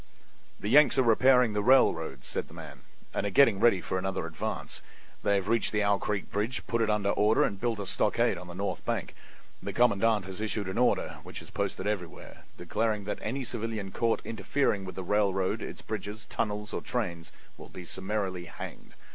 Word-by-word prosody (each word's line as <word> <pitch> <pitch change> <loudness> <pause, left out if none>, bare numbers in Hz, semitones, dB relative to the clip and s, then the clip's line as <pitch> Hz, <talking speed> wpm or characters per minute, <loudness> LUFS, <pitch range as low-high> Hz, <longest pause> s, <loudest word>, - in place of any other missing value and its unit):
"The - - -5
Yanks 145 +5 +6
are 130 - +5
repairing 125 0 +5
the 105 - 0
railroads," 85 - +3
said - - -3
the - - -14
man, - - -9 0.3
"and - - -1
are 100 - 0
getting 110 -1 +5
ready 105 -5 +4
for 95 - -2
another 95 -2 -2
advance. 80 -2 -5 0.4
They 100 -1 +2
have 95 -1 -1
reached 115 +1 +2
the 105 -1 +1
Owl 100 -1 +3
Creek 105 -2 -3
bridge, 110 +5 -2
put 115 0 0
it 110 - +2
in 105 -1 +1
order 105 +2 +3
and 100 -2 -2
built 120 -2 0
a 100 - -3
stockade 115 +4 +1
on 90 0 -9
the 85 - -9
north 100 +2 -3
bank. - - -2 0.5
The - - -5
commandant 110 -3 +3
has 95 +1 -7
issued 105 -2 -2
an 95 - -2
order, 125 - +2
which - - -8
is - - -12
posted - - -2
everywhere, 100 -5 -5
declaring 110 -2 -1
that 105 - -4
any 130 +5 -2
civilian 110 -5 -4
caught 115 +2 0
interfering 110 -1 0
with 95 - -7
the 95 - -4
railroad, 95 -1 +1
its - - -7
bridges, 105 +2 -5
tunnels, 105 -2 -3
or - - -2
trains 85 -9 -3 0.2
will - - -12
be 90 - -9
summarily 95 -1 -3
hanged. - - -9
105 Hz, 195 wpm, -29 LUFS, 95-115 Hz, 0.5 s, Yanks